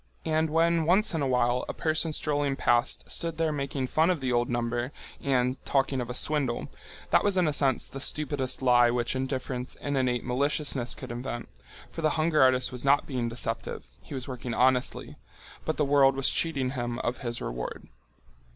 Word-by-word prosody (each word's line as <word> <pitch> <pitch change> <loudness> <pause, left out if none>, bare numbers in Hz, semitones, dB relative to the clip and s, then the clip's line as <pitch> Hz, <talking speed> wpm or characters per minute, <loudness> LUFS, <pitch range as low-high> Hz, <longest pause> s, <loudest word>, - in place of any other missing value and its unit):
And 160 0 +1
when 165 0 +2
once 195 +4 +3
in 160 - -1
a 140 - +1
while 125 -1 +2
a - - -4
person 160 0 +1
strolling 145 -2 0
past 120 -3 +1
stood 165 -1 -2
there 165 -1 +1
making 140 -2 -2
fun 160 +6 +2
of 180 -4 +1
the 130 -2 -1
old 120 0 +1
number 120 +1 -1 0.3
and 130 -1 0
talking 135 -1 +1
of 120 - -5
a 125 - -4
swindle, 140 -4 0 0.4
that - - +5
was 205 -2 +2
in 180 -3 +3
a 150 - +1
sense 135 -3 +2
the 135 - -8
stupidest 135 -3 -1
lie 120 -1 +5
which 120 +1 -1
indifference 130 -1 -3
and 145 0 -3
innate 125 -2 0
maliciousness 135 0 0
could - - -8
invent, 120 0 -5 0.4
for - - -6
the 155 - +3
hunger 155 0 +3
artist 130 -1 +4
was 125 -1 -5
not 140 +1 +4
being 125 -4 -2
deceptive—he 65 - -5
was 130 -1 -5
working 125 -2 -5
honestly—but 130 +4 -1
the 150 - +2
world 140 -1 +4
was 135 0 +1
cheating 140 -6 0
him 120 -3 -3
of 120 - -2
his 120 -2 -4
reward. - - -5
130 Hz, 185 wpm, -28 LUFS, 125-150 Hz, 0.4 s, that